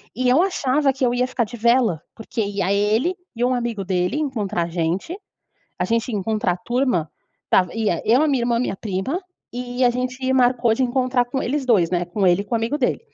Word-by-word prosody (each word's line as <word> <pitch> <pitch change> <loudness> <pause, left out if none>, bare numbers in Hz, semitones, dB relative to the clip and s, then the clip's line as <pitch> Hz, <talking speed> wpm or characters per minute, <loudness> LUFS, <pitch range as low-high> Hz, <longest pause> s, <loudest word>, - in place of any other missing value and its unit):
E 250 +2 +1
eu 255 +5 +5
achava 285 -6 +1
que 265 - -4
eu 240 - +1
ia 250 +1 +2
ficar 255 -2 -1
de 240 +3 -9
vela, 235 -7 +3 0.2
porque 225 +1 -4
ia 200 -2 -1
ele 215 - +1 0.2
e 235 - -1
um 255 +1 +2
amigo 235 -4 -2
dele, 180 +5 0
encontrar 215 - -1
a - - -7
gente. 175 - -2 0.6
A - - +1
gente 230 +2 0
ia 210 - -1
encontrar 210 -2 0
a - - -7
turma, 240 - 0 0.4
estava 180 -2 +2
ia 215 -7 0
eu, 240 +5 +4
a - - +2
minha 270 -4 +1
irmã, 240 0 +1
e - - +2
a 235 - 0
minha 225 - -2
prima, 210 - -3 0.3
eh, 245 +1 -1
a - - +5
gente 255 +1 -2
marcou 245 -3 +3
de 260 - 0
encontrar 255 0 +1
com 265 +2 -3
eles 275 +2 -1
2 200 -9 +3
né. 175 -1 +1
Com 190 +3 -1
ele 175 +2 +3
e - - -9
com 230 - -2
o - - +3
amigo 230 +6 -1
dele. 255 -4 0
240 Hz, 240 wpm, -22 LUFS, 200-255 Hz, 0.6 s, eu